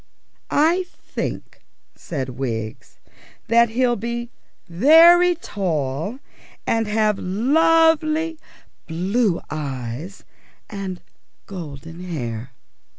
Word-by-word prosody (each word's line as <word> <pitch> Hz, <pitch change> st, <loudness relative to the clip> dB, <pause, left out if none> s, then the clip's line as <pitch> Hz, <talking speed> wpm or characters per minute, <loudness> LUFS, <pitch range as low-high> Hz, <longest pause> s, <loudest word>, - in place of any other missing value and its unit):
"I 335 Hz, +5 st, +3 dB
think," -, -, -6 dB, 0.3 s
said 135 Hz, -6 st, -5 dB
Wiggs, 115 Hz, -4 st, -5 dB, 0.5 s
"that 235 Hz, +1 st, +5 dB
he'll 240 Hz, +1 st, +1 dB
be 235 Hz, +2 st, -4 dB, 0.4 s
very 330 Hz, -, +6 dB
tall, 170 Hz, -, -3 dB, 0.5 s
and 225 Hz, -1 st, +1 dB
have 210 Hz, -1 st, +1 dB
lovely 320 Hz, -, +2 dB, 0.5 s
blue 185 Hz, +4 st, 0 dB
eyes 140 Hz, -, -5 dB, 0.5 s
and 195 Hz, -3 st, -5 dB, 0.4 s
golden 165 Hz, -3 st, -8 dB
hair." 125 Hz, -9 st, -5 dB
200 Hz, 80 wpm, -22 LUFS, -, 0.5 s, very